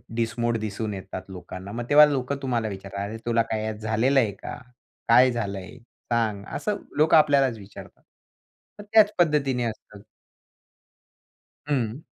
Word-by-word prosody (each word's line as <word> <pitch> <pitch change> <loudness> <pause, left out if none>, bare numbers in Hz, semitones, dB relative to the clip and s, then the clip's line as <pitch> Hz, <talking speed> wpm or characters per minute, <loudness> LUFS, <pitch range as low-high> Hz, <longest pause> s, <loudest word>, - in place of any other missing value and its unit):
डिसमोड 115 0 -1
दिसून 110 0 -4
येतात 95 -1 -7
लोकांना. 95 +1 -9
मग 120 +2 -4
तेव्हा 150 +1 +9
लोकं 140 -2 -1
तुम्हाला 120 -4 -1
विचारतात. 100 -1 -7
"अरे 110 +2 -6
तुला 115 -1 +2
काय 110 0 -2
झालेलं 110 +5 +2
आहे 110 -5 +1
का? 100 - -8 0.5
काय 125 +2 +6
झालंय 100 -4 -5 0.4
सांग?" 110 -4 0
असं 210 -1 -2 0.2
लोकं 155 +2 +5
आपल्यालाच 140 -5 +3
विचारतात" 100 -1 -13 0.8
मग 205 - -9
त्याच 215 -2 +6
पद्धतीने 145 -7 +2
असतात. 105 -2 -7 1.7
हं. 130 -2 -1
115 Hz, 135 wpm, -25 LUFS, 105-135 Hz, 1.7 s, तेव्हा